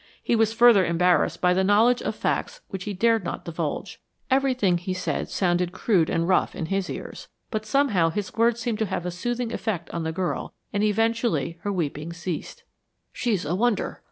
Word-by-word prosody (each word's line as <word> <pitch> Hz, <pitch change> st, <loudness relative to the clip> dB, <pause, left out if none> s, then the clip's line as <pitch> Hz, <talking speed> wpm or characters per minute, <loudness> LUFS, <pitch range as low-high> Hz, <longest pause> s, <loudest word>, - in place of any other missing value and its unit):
He 235 Hz, -, +2 dB
was 220 Hz, -1 st, +3 dB
further 230 Hz, -3 st, +6 dB
embarrassed 175 Hz, +1 st, +2 dB
by 180 Hz, 0 st, +4 dB
the 190 Hz, +1 st, +2 dB
knowledge 220 Hz, +5 st, +4 dB
of -, -, -3 dB
facts -, -, -2 dB
which 190 Hz, -3 st, -6 dB
he 205 Hz, -, -3 dB
dared 225 Hz, +1 st, +2 dB
not -, -, -5 dB
divulge. 165 Hz, -2 st, -4 dB, 0.3 s
Everything 255 Hz, -9 st, +2 dB
he 185 Hz, +1 st, -3 dB
said 185 Hz, -, -2 dB
sounded 175 Hz, -1 st, 0 dB
crude 190 Hz, -5 st, +2 dB
and 165 Hz, 0 st, 0 dB
rough 185 Hz, -, +2 dB
in 165 Hz, -, -3 dB
his 195 Hz, +2 st, -1 dB
ears, -, -, -7 dB, 0.2 s
but 215 Hz, -2 st, -3 dB
somehow 225 Hz, -13 st, +3 dB
his 200 Hz, +3 st, -4 dB
words 230 Hz, +1 st, +2 dB
seemed 230 Hz, -2 st, -2 dB
to 220 Hz, -, 0 dB
have 175 Hz, -, -3 dB
a 180 Hz, -, -2 dB
soothing 240 Hz, +6 st, -3 dB
effect 195 Hz, -8 st, -3 dB
on 170 Hz, -, -3 dB
the 160 Hz, 0 st, -2 dB
girl 180 Hz, +2 st, -3 dB, 0.2 s
and 205 Hz, -, 0 dB
eventually 215 Hz, -, 0 dB
her 205 Hz, -, -2 dB
weeping 160 Hz, -2 st, -3 dB
ceased. 170 Hz, -1 st, -6 dB, 0.5 s
"She's 215 Hz, -9 st, -1 dB
a 155 Hz, -, -1 dB
wonder!" 230 Hz, +3 st, 0 dB
195 Hz, 190 wpm, -25 LUFS, 175-230 Hz, 0.5 s, further